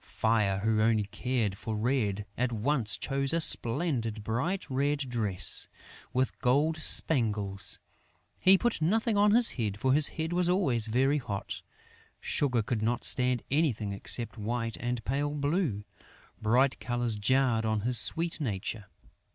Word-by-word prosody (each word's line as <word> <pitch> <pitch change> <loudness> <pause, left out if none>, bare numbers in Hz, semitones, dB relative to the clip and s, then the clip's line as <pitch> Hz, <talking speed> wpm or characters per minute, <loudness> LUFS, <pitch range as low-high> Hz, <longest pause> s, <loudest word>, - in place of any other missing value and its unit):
Fire, 110 -4 0
who 110 0 0
only 110 -1 +2
cared 110 0 -3
for 110 0 -5
red, 105 -3 -1
at 125 0 -1
once 115 0 0
chose 140 0 -2
a 165 - +1
splendid 115 -6 +1
bright 135 - -3
red 140 +2 -1
dress, 110 -7 -1 0.4
with 130 +1 -2
gold 145 +5 +1
spangles. 105 -11 +1 0.6
He 190 +1 +6
put 240 -5 -2
nothing 220 +7 0
on 205 +1 +3
his 230 +3 +8
head, 105 -5 -4
for 130 +3 +1
his 150 +1 +5
head 160 +1 -5
was 175 0 +1
always 135 - +3
very 135 +6 +1
hot. 100 -6 -6 0.6
Sugar 125 -6 -1
could 110 0 -3
not 115 +2 -1
stand 125 -1 +1
anything 120 -9 0
except 115 +3 -1
white 115 +1 -3
and 120 -1 -4
pale 145 +3 -2
blue: 145 - -2 0.6
bright 125 +5 +1
colors 120 -2 -2
jarred 115 +2 +1
on 110 -1 -1
his 120 +2 +3
sweet 165 +1 +2
nature. 105 -3 -4
125 Hz, 145 wpm, -28 LUFS, 110-145 Hz, 0.6 s, his